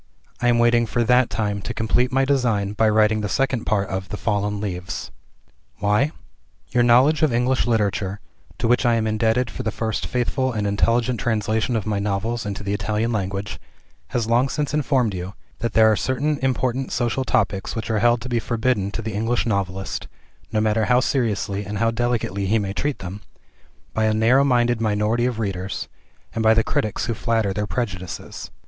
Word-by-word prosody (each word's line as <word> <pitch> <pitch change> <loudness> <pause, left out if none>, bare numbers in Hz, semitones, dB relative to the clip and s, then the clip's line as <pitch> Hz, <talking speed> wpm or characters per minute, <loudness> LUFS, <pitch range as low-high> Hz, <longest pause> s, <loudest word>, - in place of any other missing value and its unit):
I 120 - +2
am 120 -1 +4
waiting 120 0 +3
for 120 +2 0
that 125 +2 +4
time, 105 -2 -2
to - - -5
complete 120 +3 +1
my 135 +1 +2
design 115 -8 +1
by 110 +1 +3
writing 110 0 +3
the 105 - -2
second 135 -2 0
part 100 -2 +1
of 95 -1 -4
"The 105 - -4
Fallen 105 -1 -1
Leaves." 90 -3 -5 0.7
Why? 105 +8 +2 0.6
Your 125 - +3
knowledge 130 +6 +5
of 155 -4 +3
English 125 +2 +1
Literature 105 -3 0 0.4
to - - 0
which 125 +2 +3
I 120 -2 +3
am 115 -1 0
indebted 110 +2 +1
for - - -5
the 110 - -1
first 110 0 -2
faithful 130 +1 0
and 105 -2 -1
intelligent 115 +4 +1
translation 110 +1 0
of 110 -4 -1
my 105 -2 -1
novels 105 +3 -2
into 100 +1 -5
the 100 0 -2
Italian 110 +3 -1
language 100 -1 -3 0.5
has 120 +5 -1
long 120 +4 +2
since 150 0 -2
informed 135 -7 +1
you, 90 +2 -6 0.2
that 115 -2 -2
there 110 0 +6
are - - +3
certain 140 +6 -1
important 130 0 0
social 120 +1 0
topics 100 -6 0
which 115 0 -3
are 110 - +1
held 120 +1 +3
to 125 - -6
be 120 -1 +1
forbidden 115 -3 0
to 115 - -4
the 110 0 -4
English 115 +4 0
novelist 95 -3 -2 0.4
(no 110 - +1
matter 110 0 +2
how 125 0 +4
seriously 105 -6 -1
and 105 +1 -5
how 115 +3 +2
delicately 115 -4 -1
he 110 +4 +3
may 100 -2 -2
treat 145 +6 -2
them), 95 +3 -7 0.7
by 110 - +1
a 110 0 +2
narrow 120 +5 +4
minded 120 -3 +2
minority 110 +2 +1
of 125 -3 -3
readers, 95 -3 -3 0.5
and 115 - -2
by 110 0 +5
the 115 - +3
critics 105 -1 -1
who 115 - -1
flatter 110 -3 0
their 105 +1 -2
prejudices. 95 -8 -5
110 Hz, 195 wpm, -22 LUFS, 105-120 Hz, 0.7 s, there